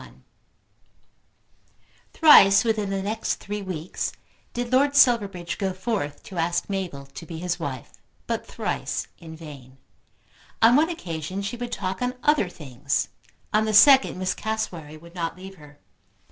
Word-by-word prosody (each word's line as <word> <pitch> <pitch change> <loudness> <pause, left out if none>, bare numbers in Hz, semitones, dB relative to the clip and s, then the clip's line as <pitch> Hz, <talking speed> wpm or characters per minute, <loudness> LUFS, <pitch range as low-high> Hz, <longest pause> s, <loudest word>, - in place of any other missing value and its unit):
1 - - -16 1.9
Thrice 200 - +7
within 220 -3 0
the 195 -1 -2
next 220 +3 -2
three 205 +1 -6
weeks 185 -3 -4 0.4
did 245 0 -4
Lord 280 +2 +3
Silverbridge 200 - +3
go 190 -2 -1
forth 185 -7 -3
to 185 -3 -7
ask 170 +1 0
Mabel 185 -8 -4
to 135 +3 -11
be 165 0 -8
his 175 +1 -3
wife, 135 -7 -6 0.3
but - - -2
thrice - - -3
in 160 -1 -10
vain. 140 -5 -12 0.8
On 230 +2 +6
one 315 +4 +4
occasion 185 - -5
she 205 +5 -4
would 240 0 -6
talk 190 0 -3
on 250 0 -1
other 295 -11 +3
things. 140 -4 -3 0.4
On 215 +1 +3
the 215 -1 0
second 270 +3 +7
Miss 185 0 -1
Cassewary 175 -9 -4
would 170 +2 -15
not 170 -1 -4
leave 190 +1 -11
her. 150 -2 -16
190 Hz, 150 wpm, -24 LUFS, 165-220 Hz, 1.9 s, Thrice